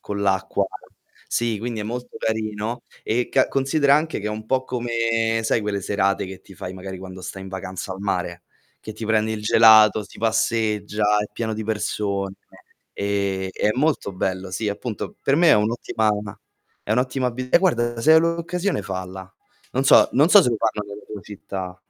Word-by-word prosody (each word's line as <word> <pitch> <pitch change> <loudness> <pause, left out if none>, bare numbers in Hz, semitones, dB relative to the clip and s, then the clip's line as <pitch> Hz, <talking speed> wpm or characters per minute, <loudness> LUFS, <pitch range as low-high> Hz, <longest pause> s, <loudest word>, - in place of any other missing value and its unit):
con 100 0 -5
l' 100 - -1
acqua 95 -1 +1 0.6
sì, 115 -2 0
quindi 115 0 -4
è - - -2
molto 120 +2 -6
carino. 110 +1 -2 0.2
E 120 +2 0
ca 130 - +3
considera 140 +1 +3
anche 155 -5 0
che 105 - -4
è - - -1
un 110 0 -5
po' 130 +1 +1
come, 115 -2 0
sai, 110 - +2
quelle 100 -1 -2
serate 100 -1 0
che 95 0 -9
ti 95 - -15
fai 90 - -7
magari 95 0 -7
quando 95 0 -9
stai 95 +1 -7
in 95 - -8
vacanza 95 0 -5
al 95 - -9
mare, 90 -3 -2 0.4
che 110 - -8
ti 110 0 -7
prendi 110 0 +1
il 105 - -4
gelato, 110 -1 +6
si - - -15
passeggia, 105 -2 +1
è 105 - -2
pieno 110 -2 -3
di 110 - -4
persone. 100 -2 -2 0.6
Ehm, 100 -1 -1
è 105 - +1
molto 140 -7 0
bello, 95 0 -3
sì, 105 +3 -2
appunto 105 +1 -5
per 140 - +2
me 170 0 +5
è - - +8
un'ottima 110 0 +1
ma 100 -2 -9 0.4
è 105 - -1
un'ottima 125 +2 +1
abi 125 +1 -5
e - - +7
guarda, 120 -10 +1
se 160 +4 +6
hai 160 - +7
l'occasione 170 - -1
falla, 95 0 -6 0.4
non 130 +2 0
so - - +7
non 150 +5 +4
so 205 +1 +8
se 125 - +1
lo 115 - 0
fanno 105 0 -1
nella 105 - -10
tua 105 -2 -7
città. 95 -3 -7
110 Hz, 195 wpm, -23 LUFS, 100-120 Hz, 0.6 s, è